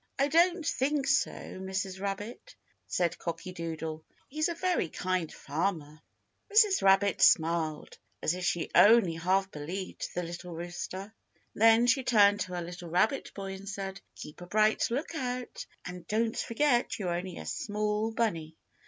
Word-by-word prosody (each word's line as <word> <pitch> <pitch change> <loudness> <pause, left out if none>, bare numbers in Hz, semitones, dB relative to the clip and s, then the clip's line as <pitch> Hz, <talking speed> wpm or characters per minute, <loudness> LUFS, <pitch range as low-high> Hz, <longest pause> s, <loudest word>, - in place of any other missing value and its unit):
"I 275 +2 +2
don't 340 +2 +3
think 280 0 0
so, 275 0 +3
Mrs. 190 0 -5
Rabbit," 205 - -5 0.3
said 175 -2 -1
Cocky 170 +2 -5
Doodle; 160 -2 -5 0.3
"he's 310 +4 0
a 340 - -3
very 360 - 0
kind 180 -2 -2
farmer." 155 -1 -3 0.5
Mrs. 420 -2 +5
Rabbit 195 0 +4
smiled, 160 -1 +2 0.2
as 155 - 0
if 180 0 -5
she 175 -2 -1
only 215 -5 +6
half 190 +4 0
believed 175 +6 -5
the 180 - -1
little 175 0 -7
rooster. 175 +4 -6 0.4
Then 225 +2 +5
she 260 +2 +3
turned 205 -4 +5
to 185 -3 -3
her 175 - -3
little 175 0 -8
rabbit 215 - +1
boy 195 -1 -5
and 195 +1 -8
said, 195 -1 -5
"Keep 150 +4 -10
a 175 - -8
bright 215 +3 +2
lookout, 250 -2 -4 0.2
and 180 -1 -8
don't 225 +1 0
forget 245 +1 +1
you're 180 -5 -2
only 180 +1 -4
a 80 - -7
small 210 - -1
bunny." 165 -9 -2
195 Hz, 155 wpm, -30 LUFS, 175-230 Hz, 0.5 s, only